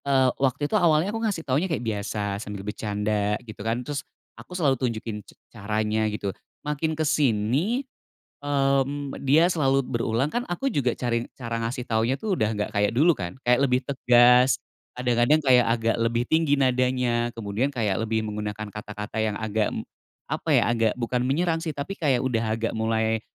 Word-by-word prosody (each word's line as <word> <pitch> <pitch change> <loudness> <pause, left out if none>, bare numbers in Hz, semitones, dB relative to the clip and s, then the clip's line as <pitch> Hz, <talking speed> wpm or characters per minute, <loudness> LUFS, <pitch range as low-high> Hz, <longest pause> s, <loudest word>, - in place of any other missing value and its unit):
Eee, 135 -2 +4
waktu 135 +2 +1
itu 145 - -5
awalnya 175 -1 +3
aku 225 - -3
ngasih 200 -8 -2
taunya 145 +8 0
kayak 155 -7 -2
biasa, 105 -1 -2
sambil 105 -2 -7
bercanda, 105 0 -1
gitu 110 -2 -10
kan, 115 +3 -2
terus 145 -2 -3 0.3
aku 180 - -9
selalu 145 -6 +3
tunjukin 115 -3 -3
c - - -19 0.2
caranya, 110 0 -1
gitu. 100 -2 -3 0.3
Makin 150 +1 -1
kesini, 150 - +1 0.6
mmm, 140 0 0
dia 150 +5 +5
selalu 135 -6 +1
berulang 115 +1 0
kan, 240 - +1
aku 175 +10 -2
juga 130 -3 +2
cari 120 -2 0 0.2
cara 115 -2 -3
ngasih 120 +2 -3
taunya 115 +4 +1
tuh 215 -3 -1
udah 110 -10 0
nggak 105 -1 -2
kayak 105 0 +2
dulu 165 +4 +5
kan, 90 0 -6
kayak 125 +2 +4
lebih 125 -2 +2
tegas, 125 -1 +5 0.4
kadang-kadang 125 +4 +3
kayak 130 -5 +4
agak 115 -1 +1
lebih 115 +1 0
tinggi 160 -2 +2
nadanya, 125 -2 +1
kemudian 110 +5 -1
kayak 110 -6 -1
lebih 110 0 -1
menggunakan 105 0 -4
kata-kata 105 +1 -5
yang 105 -2 -1
agak, 110 -1 0 0.6
apa - - -4
ya, - - +5
agak 115 -2 +2
bukan 125 +1 -1
menyerang 165 +5 0
sih, 165 - -2
tapi 145 +6 -5
kayak 145 -9 +1
udah 115 -3 0 0.2
agak 115 0 -1
mulai, 110 0 0
120 Hz, 170 wpm, -25 LUFS, 110-140 Hz, 0.6 s, dia